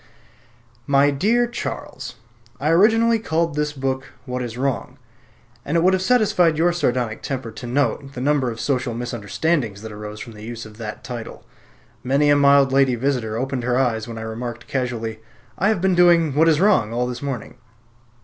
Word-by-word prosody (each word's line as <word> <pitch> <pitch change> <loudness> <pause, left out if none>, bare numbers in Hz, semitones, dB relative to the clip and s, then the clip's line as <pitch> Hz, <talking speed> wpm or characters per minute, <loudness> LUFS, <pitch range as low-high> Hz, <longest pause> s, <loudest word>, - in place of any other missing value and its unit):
My 140 +1 +4
Dear 220 - +2
Charles, 240 - -6 0.4
I 150 - 0
originally 225 +6 +4
called 165 -5 0
this 150 0 -1
book 130 -2 -3
"What 125 0 -3
is 120 -1 -5
Wrong," 135 -1 -2 0.7
and 155 +4 0
it 165 - +2
would 185 +1 +4
have 185 - +1
satisfied 185 -8 +3
your 175 +2 +3
sardonic 125 -8 -1
temper 130 -4 -4
to 120 +3 -8
note 135 +1 -1
the 125 - -6
number 135 -1 +1
of 115 -1 -6
social 125 -1 -1
misunderstandings 120 0 -2
that 110 - -7
arose 105 0 -8
from 115 - -8
the 105 - -12
use 115 0 -7
of 105 0 -13
the 110 -2 -6
title. 120 -3 -7 0.6
Many 140 +3 +3
a - - +6
mild 140 -1 +5
lady 135 -2 +3
visitor 120 -3 -1
opened 130 +1 -2
her 125 0 +1
eyes 120 -4 0
when 115 -1 -7
I - - -5
remarked 120 +1 -6
casually, 120 -4 -3 0.4
"I 195 - +1
have 215 -5 +1
been 190 0 +2
doing 170 -4 +4
'What 160 +4 +4
is 155 -2 +3
Wrong' 185 - +3
all 120 +1 0
this 125 -1 -5
morning." 130 -3 -5
135 Hz, 185 wpm, -21 LUFS, 120-160 Hz, 0.7 s, a